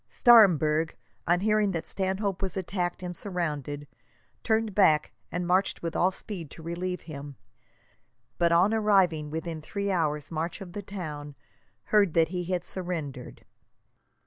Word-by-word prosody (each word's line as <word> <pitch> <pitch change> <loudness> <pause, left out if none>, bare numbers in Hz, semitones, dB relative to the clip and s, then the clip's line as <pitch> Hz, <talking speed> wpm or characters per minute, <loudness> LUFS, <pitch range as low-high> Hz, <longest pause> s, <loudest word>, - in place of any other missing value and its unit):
Staremberg, 165 - +5 0.3
on 175 +1 +3
hearing 215 0 +2
that 165 - -3
Stanhope 195 0 -1
was 190 -1 -3
attacked 180 -1 -2
and 180 0 -5
surrounded, 150 -7 -3 0.6
turned 220 -2 +1
back 155 -6 +4 0.2
and 180 0 -2
marched 185 +1 +1
with 165 -1 -3
all 180 - +4
speed 190 -4 -7
to 160 - -12
relieve 180 +2 -3
him, 145 -3 -8 1.0
but 170 -1 +3
on 180 +6 +4
arriving 190 -8 +3
within 160 +1 -4
three 200 +5 -3
hours' 150 -5 -1
march 165 +3 -3
of 185 -3 -9
the 205 - -4
town, 150 -8 -7 0.6
heard 200 -6 +4
that 165 -1 +4
he 180 0 -3
had 180 -1 -2
surrendered. 160 -9 -5
175 Hz, 145 wpm, -28 LUFS, 160-195 Hz, 1.0 s, Staremberg